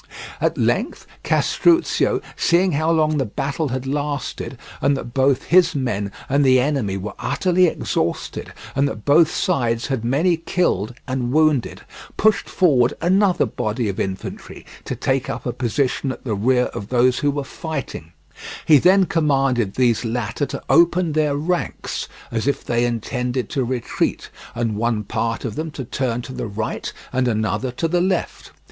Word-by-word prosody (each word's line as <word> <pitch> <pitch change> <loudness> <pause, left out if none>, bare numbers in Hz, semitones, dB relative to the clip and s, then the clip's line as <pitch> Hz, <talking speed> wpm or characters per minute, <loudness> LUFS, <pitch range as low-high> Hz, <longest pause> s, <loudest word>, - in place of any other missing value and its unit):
At - - +1
length - - 0 0.2
Castruccio, 345 0 +2
seeing 180 +2 +3
how 155 +2 0
long 155 -2 +2
the 135 - +1
battle 140 +7 -2
had 130 0 -3
lasted, 145 +1 -3 0.2
and 140 -1 +2
that 120 -3 -7
both 135 -1 +2
his 180 -1 +4
men 105 -7 -2 0.2
and 140 +2 +2
the 130 -1 +5
enemy 125 -8 0
were 100 +3 -5
utterly 180 -1 +2
exhausted, - - -2 0.2
and 140 +1 +2
that 110 -6 -6
both 155 +3 +5
sides 120 - 0
had 130 -5 -2
many 155 +9 +2
killed 140 - -1
and 130 -2 -2
wounded, 155 -3 +2 0.4
pushed 215 0 +2
forward 135 -10 +3
another 190 0 +3
body 110 0 -2
of 95 - -4
infantry 95 0 -5 0.2
to - - -3
take - - -1
up - - -5
a - - -2
position 130 +2 -1
at - - -9
the 115 - -2
rear 125 +5 +2
of 100 - -6
those 125 0 +3
who 145 - +1
were 145 0 -2
fighting; 135 - -6 0.5
he 150 -3 +7
then 190 +4 +5
commanded 135 - +1
these 120 -3 +2
latter 120 +3 -2
to - - -6
open 170 0 +4
their 150 -2 +1
ranks 175 +4 -2 0.2
as 115 +2 -2
if 140 - 0
they 120 0 +1
intended 125 +1 -2
to 135 - -1
retreat, 125 -1 -2 0.2
and 115 -2 -1
one 115 -1 0
part 115 +4 -2
of 115 - -3
them 160 +5 -4
to 145 -3 -6
turn 120 -1 -2
to 130 - -8
the 115 - -4
right 110 +1 -4 0.2
and 130 0 +1
another 110 +3 -1
to 165 +7 -1
the 175 +2 +1
left. 185 -1 -2
135 Hz, 165 wpm, -21 LUFS, 120-155 Hz, 0.5 s, he